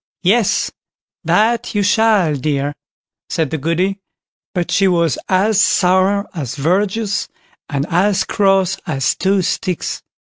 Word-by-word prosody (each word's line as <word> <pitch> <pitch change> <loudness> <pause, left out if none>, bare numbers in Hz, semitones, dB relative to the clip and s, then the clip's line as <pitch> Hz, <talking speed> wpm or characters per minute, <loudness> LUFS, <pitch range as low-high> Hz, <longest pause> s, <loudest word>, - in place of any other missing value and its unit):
"Yes, 205 +3 +2 0.5
that 230 +1 +1
you 205 - +2
shall, 205 -5 +3
dear", 145 +1 -1 0.6
said 160 -4 -1
the 160 - -2
Goody; 180 +6 -1 0.6
but 175 -1 -2
she 195 - +3
was 170 -7 +1
as 195 +2 +3
sour 190 +2 +2
as 145 -9 -5
verjuice, 200 +7 0 0.4
and 140 -2 -1
as 190 +3 +2
cross 195 -2 +1
as 135 -4 0
two 195 0 +1
sticks. 185 -1 -2
185 Hz, 120 wpm, -17 LUFS, 165-200 Hz, 0.6 s, shall